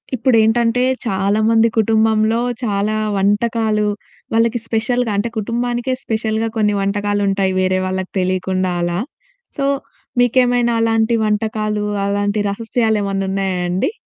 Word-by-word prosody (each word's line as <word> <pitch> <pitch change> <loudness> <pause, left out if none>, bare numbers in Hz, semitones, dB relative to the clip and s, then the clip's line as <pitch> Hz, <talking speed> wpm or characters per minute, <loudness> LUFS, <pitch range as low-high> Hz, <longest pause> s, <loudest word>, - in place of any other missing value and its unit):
ఇప్పుడేంటంటే, 230 0 +2 0.2
చాలా 200 +1 +1
మంది 230 0 +4
కుటుంబంలో 220 0 +2 0.2
చాలా 210 -1 0 0.2
వంటకాలు 210 +1 +1 0.5
వాళ్ళకి 230 +1 +2
స్పెషల్‌గా 230 +1 0
అంటే, 215 +4 0
కుటుంబానికే 240 +3 -1
స్పెషల్‌గా 220 0 -1
కొన్ని 210 -1 +2
వంటకాలుంటాయి 200 -1 0
వేరే 185 0 +1
వాళ్ళకి 185 0 -3
తెలియకుండా 185 0 0
అలా. 175 0 -1 0.6
సో 275 - 0 0.5
మీకేమైనా 245 0 +3
అలాంటి 225 0 +2
వంటకాలు, 215 0 -1 0.2
అలాంటి 205 +1 0
రహస్యా‌లేమన్నా 210 -3 -1
ఉన్నాయా 190 -2 -1
అండి? 185 - 0
215 Hz, 105 wpm, -18 LUFS, 200-230 Hz, 0.6 s, మంది